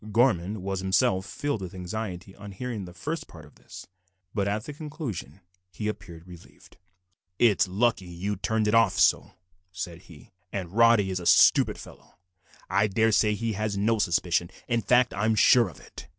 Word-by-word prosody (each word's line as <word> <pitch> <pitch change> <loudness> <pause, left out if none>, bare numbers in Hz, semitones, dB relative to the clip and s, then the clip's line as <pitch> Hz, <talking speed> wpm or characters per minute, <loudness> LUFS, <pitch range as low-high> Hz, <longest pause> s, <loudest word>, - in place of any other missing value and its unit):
Gorman 105 -4 +1
was 95 -1 -3
himself 95 0 +1
filled 145 -8 -3
with 95 0 -7
anxiety 95 0 -6
on 100 -1 -10
hearing 110 -1 -5
the 90 - -11
first 155 - -5
part 80 -3 -13
of 75 - -19
this, - - -12 0.5
but 100 -2 -1
at 105 +1 -2
the 150 - -8
conclusion 135 - -7 0.3
he 105 - -5
appeared 85 -5 -7
relieved. 90 -2 -16 0.6
"It's 105 -3 +3
lucky 95 -1 0
you 90 +4 -4
turned 110 +3 -1
it 105 - +1
off 115 -4 +4
so," - - +3 0.4
said 85 -2 -7
he, 75 -5 -15 0.2
"and 95 -4 -5
Roddy 115 -3 +4
is 90 - -2
a 85 - -4
stupid - - +5
fellow. - - -14 0.5
I 100 +1 +2
daresay 105 +1 +2
he 115 +1 -2
has 105 0 -2
no 110 +2 +1
suspicion. 85 -2 0 0.2
In 120 -2 0
fact, 125 +4 +3
I 100 +2 -1
am 110 0 +2
sure 115 0 +5
of 80 - -15
it." - - -12
100 Hz, 180 wpm, -26 LUFS, 90-115 Hz, 0.6 s, stupid